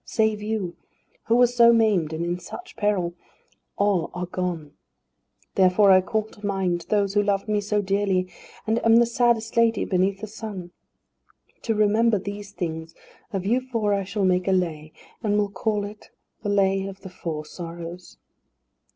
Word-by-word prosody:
Save 220 -1 0
you 210 -5 -3 0.5
who 230 - +3
were 245 +1 +7
so 240 -1 +5
maimed 215 -9 +3
and 160 +2 -3
in 175 +1 -2
such 355 - -10
peril 195 -5 0 0.6
all 200 -4 +1
are 180 0 -2
gone. 175 -5 -4 0.8
Therefore 195 +1 +5
I 185 0 +7
call 220 +3 -1
to 215 -1 -17
mind 190 -4 -1
those 200 -2 +1
who 205 - +4
loved 200 0 0
me 210 -1 +1
so 205 0 0
dearly, 195 -1 +1 0.4
and 225 +2 0
am 225 0 +6
the 235 +1 +6
saddest 235 -1 +1
lady 230 -1 +3
beneath 190 +1 +1
the - - -3
sun. 205 -4 -7 0.9
To 225 - -1
remember 215 +1 +3
these 200 +1 -6
things, 165 -3 -5 0.4
of 190 -2 -3
you 240 +5 +2
four 230 -5 -1
I 200 -1 0
shall 200 +1 -1
make 180 0 +2
a - - +3
Lay, 155 -4 -1 0.3
and 210 -2 +1
will 205 -1 +1
call 210 -1 -1
it 210 +1 -11 0.3
the 205 - -3
Lay 195 -1 +2
of 195 0 -9
the 190 - -9
Four 160 -4 -5
Sorrows." 170 +1 -8
200 Hz, 170 wpm, -24 LUFS, 180-215 Hz, 0.9 s, were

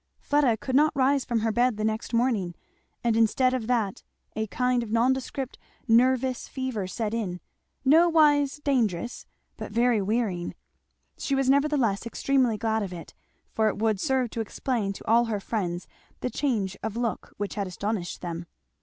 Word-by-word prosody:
Fleda 285 -6 +2
could 255 +3 -3
not 305 +2 +4
rise 270 0 +3
from 235 -3 0
her 225 0 +1
bed 240 0 +2
the 215 - -2
next 220 +1 -2
morning; 230 -8 +1 0.5
and 235 -2 +2
instead 240 +3 +3
of 240 -4 -2
that 225 -6 0 0.3
a 220 0 -1
kind 250 +3 +1
of 230 - -6
nondescript 260 +3 0 0.3
nervous 255 +2 +3
fever 260 -8 -3
set 215 +3 -3
in; 195 -6 -2 0.5
nowise 300 -2 +5
dangerous, 240 -6 0 0.3
but - - -7
very 235 0 +3
wearying. 195 -4 -1 0.6
She 275 - 0
was 270 -1 +3
nevertheless 275 -7 +2
extremely 255 -2 +1
glad 220 +1 0
of 195 -3 -4
it, 170 -3 -9 0.4
for 220 -1 +2
it 215 - -1
would 215 -2 +1
serve 260 -2 0
to 230 - -2
explain 220 -1 -2
to - - -11
all 235 +2 +5
her 220 -3 -2
friends 185 -4 -3 0.3
the 250 - -2
change 215 -10 -1
of 220 +1 -4
look 235 -2 -3
which 205 0 -3
had 200 -2 -2
astonished 195 0 -3
them. 170 -1 -5
230 Hz, 165 wpm, -26 LUFS, 210-260 Hz, 0.6 s, nowise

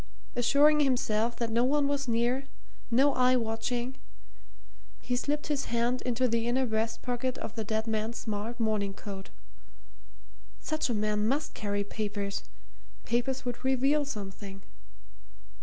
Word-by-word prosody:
Assuring 285 +5 +5
himself 235 -4 +2
that 230 -2 -2
no 235 +2 +3
one 280 +2 +3
was 280 -1 -1
near, 240 +3 +1 0.4
no 270 +4 +4
eye 255 0 +4
watching, 240 +2 -1 1.0
he 250 - -1
slipped 290 +4 -1
his 290 -3 -1
hand 240 +2 +1
into 250 +1 +1
the 230 0 +1
inner 260 +2 +2
breast 225 0 -1
pocket 250 +1 -1
of 220 - -5
the 220 - -3
dead 220 +1 -1
man's 220 +1 -1
smart 220 +2 -4
morning 210 -3 0
coat. 195 -2 -7 1.3
Such 310 -4 -1
a 235 - +1
man 210 0 +1
must 280 +6 0
carry 205 -1 -1
papers 205 -1 -3 0.6
papers 250 +3 0
would 245 0 -4
reveal 270 +3 +3
something. 200 -6 -6
235 Hz, 140 wpm, -30 LUFS, 220-260 Hz, 1.3 s, Assuring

